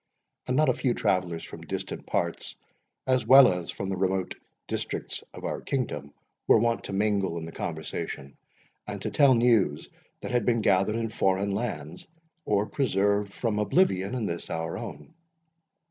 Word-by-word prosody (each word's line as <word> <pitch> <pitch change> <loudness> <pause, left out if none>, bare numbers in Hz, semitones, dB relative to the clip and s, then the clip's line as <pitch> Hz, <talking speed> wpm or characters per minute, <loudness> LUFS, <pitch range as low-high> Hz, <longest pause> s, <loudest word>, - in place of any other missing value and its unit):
And 125 - 0
not 155 0 +4
a 130 - +4
few 120 0 0
travellers, 90 -3 0
from - - -9
distant - - -5
parts, - - -2 0.5
as 130 -1 +2
well 130 -5 +9
as 90 -1 -5
from 95 - -4
the 95 - -2
remote 95 0 0 0.3
districts - - -4
of - - -11
our - - -3
kingdom, 75 - -3 0.4
were - - +7
wont 115 +1 +1
to - - -6
mingle 100 -3 0
in 80 - -5
the 80 - -8
conversation, 80 -4 -5 0.5
and - - -5
to - - -2
tell 140 -3 +5
news 115 -11 +2 0.3
that - - -5
had 120 -2 +2
been 115 +1 +2
gathered 100 +2 +3
in 115 -1 -1
foreign 95 -1 +1
lands, 100 -7 -4 0.4
or 105 0 +2
preserved 100 -5 +1
from 105 -1 -1
oblivion 105 - +2
in 120 -4 -2
this 85 -3 -4
our 80 0 -3
own. 75 - -8
100 Hz, 165 wpm, -27 LUFS, 90-120 Hz, 0.5 s, well